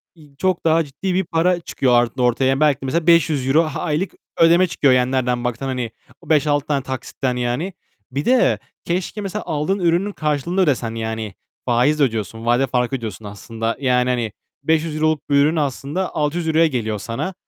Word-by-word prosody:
İii, 150 -3 -19
çok 185 -2 0
daha 165 +1 +4
ciddi 160 +7 -4
bir 190 +1 +1
para 175 +2 +1
çıkıyor 125 -7 +2
or 125 - +1
ortaya. 130 +3 +2
Belki 145 -3 +3
de - - -5
mesela 165 +5 -1
€500 155 -2 +3
aylık 170 +3 -1 0.3
ödeme 170 +3 +5
çıkıyor, 140 -5 +3
yani 125 0 +2
nereden 125 -2 0
baksan 125 +2 -3
hani. 125 -3 -3 0.3
O - - -16
5-6 145 -2 +2
tane 140 -3 0
taksitten 130 -1 -3
yani. 125 +10 -2 0.4
Bir 140 +3 -3
de, 255 0 +3 0.3
keşke 180 +4 -2
mesela 200 +2 -4
aldığın 160 +6 -1
ürünün 175 +4 +1
karşılığını 155 +3 -1
ödesen 120 -8 0
yani. 110 -3 -4 0.3
Faiz 130 +5 +2
ödüyorsun. 115 -2 -1
Vade 120 +3 +2
farkı 125 +1 0
ödüyorsun 110 -4 -6
aslında. 115 +2 -4
Yani 125 -2 +2
hani 120 -4 -1 0.3
€500 155 0 +1
olup 155 -2 0
bu - - 0
ürün 150 +4 +4
aslında 145 +5 -2
€600'ya 160 +1 +2
geliyor 110 -6 -2
sana. 120 - -4
140 Hz, 170 wpm, -20 LUFS, 125-165 Hz, 0.4 s, ödeme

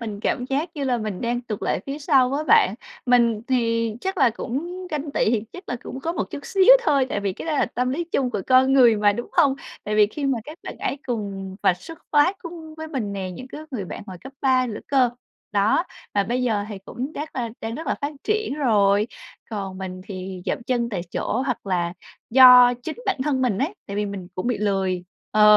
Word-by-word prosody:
mình 210 -3 -5
cảm 245 - 0
giác 285 +6 -1
như 285 -2 -3
là 250 -2 +1
mình 215 -4 -4
đang 240 +1 -1
tụt 220 -4 -6
lại - - 0
phía 280 +2 -4
sau 275 -4 +4
với 290 +3 -1
bạn, 450 +5 +5 0.3
mình 235 -3 +3
thì 230 -3 +1
chắc 380 0 -3
là 255 -3 +5
cũng 345 +11 -5
ganh 300 -1 -3
tị 215 - +2
thì 225 -3 0
chắc 365 +2 -11
là 245 - -2
cũng 260 - -7
có 330 +5 -2
một 210 - -1
chút - - -5
xíu 390 +4 +6
thôi, 280 - +3
tại 205 - -2
vì 200 -1 -1
cái 255 - -8
đó 320 - 0
là 290 - +2
tâm 250 +1 -1
lý 335 +6 -1
chung 275 -7 0
của 205 -4 -2
con 260 +1 +5
người 245 -5 +6
mà, 205 0 +4
đúng 240 +4 -6
không? 290 -6 +4 0.3
Tại 210 - -2
vì 210 -1 +6
khi 280 +6 -4
mà 270 -3 +1
các 310 +5 -10
bạn - - -7
ấy 275 - -2
cùng 195 -5 -4
và 180 - +4
xuất 325 - -11
phát 300 +7 +4
cung 330 -2 -9
với 315 0 -7
mình 235 -10 -3
nè, 190 -2 -4
những 255 +8 -8
cái 300 - -8
người 215 -8 -3
bạn 185 - -7
hồi 185 - -8
cấp 265 - -10
3 255 -1 +3
nữa 215 -3 -5
cơ. 260 -3 +3 0.4
Đó, 205 - +3 0.3
mà 200 -1 +3
bây 250 +2 -1
giờ 215 -4 +1
thì 205 - -6
cũng 260 +6 -5
chắc 300 -1 -6
là 235 -2 -2
đang 225 +1 -4
rất 320 - -6
là - - +1
phát 285 +1 -2
triển 430 -7 0
rồi, 210 -7 +3 0.4
còn 195 -3 -4
mình 185 -1 -6
thì 185 -2 -7
dậm - - -1
chân 240 -1 0
tại 200 -6 -3
chỗ 255 +4 -1
hoặc 250 -5 -3
là 175 -2 0 0.4
do 250 -1 +9
chính 315 - -5
bản 395 - +1
thân 265 -3 +1
mình 220 -6 +1
ấy, 320 +10 -1
tại 200 - -5
vì 210 - 0
mình 195 -3 -6
cũng 185 - -3
bị 245 - 0
lười. 190 -3 0 0.3
Ờ, 210 0 +7
245 Hz, 240 wpm, -23 LUFS, 205-285 Hz, 0.4 s, do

